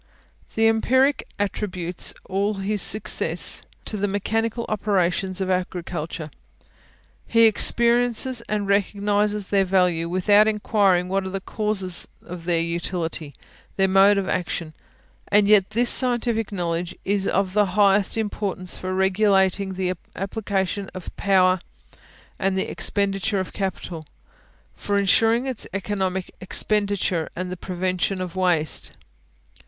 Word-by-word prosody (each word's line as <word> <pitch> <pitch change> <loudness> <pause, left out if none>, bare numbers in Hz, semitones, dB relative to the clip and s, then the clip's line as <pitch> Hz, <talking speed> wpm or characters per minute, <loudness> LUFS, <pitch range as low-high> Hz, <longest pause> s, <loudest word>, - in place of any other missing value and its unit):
The 225 0 +4
empiric 260 +5 +2
attributes 185 -4 -1 0.2
all 200 +2 0
his 195 +1 -2
success 215 +3 +1 0.2
to 215 - -3
the 205 +1 0
mechanical 225 +4 -1
operations 190 -2 0
of 190 0 0
agriculture; 170 -3 -3 1.0
he 230 0 +4
experiences 235 +2 +3
and 205 -1 -1
recognises 205 0 0
their 200 -1 +3
value, 180 -3 +1
without 205 +4 +4
inquiring 205 -4 +2
what 195 +1 0
are 190 - -4
the 195 +1 -3
causes 195 -3 -2 0.2
of 175 -1 -8
their 170 -2 +2
utility, 170 -3 -3 0.4
their 195 -1 +3
mode 195 +2 +5
of 195 -1 -1
action: 170 -3 -3 0.5
and 205 0 +4
yet 205 -2 +5
this 240 +2 +1
scientific 240 -4 +1
knowledge 175 -2 -2
is 200 0 +1
of 190 -1 0
the 210 -1 +3
highest 200 0 +4
importance 200 -4 -3
for 185 0 -4
regulating 190 0 +2
the 185 -1 -1 0.2
application 195 0 -2
of 185 - -8
power 185 -2 +3 0.8
and 190 0 0
the 190 - 0
expenditure 200 0 0
of 185 - -5
capital, 185 -4 -4 0.7
for 205 0 -1
insuring 225 +5 +3
its 260 -4 -3
economical 190 -2 -2
expenditure 200 -3 -1
and 180 0 -4
the - - -3
prevention 185 +1 -2
of 185 -1 -5
waste. 175 -4 0
195 Hz, 125 wpm, -23 LUFS, 185-210 Hz, 1.0 s, mode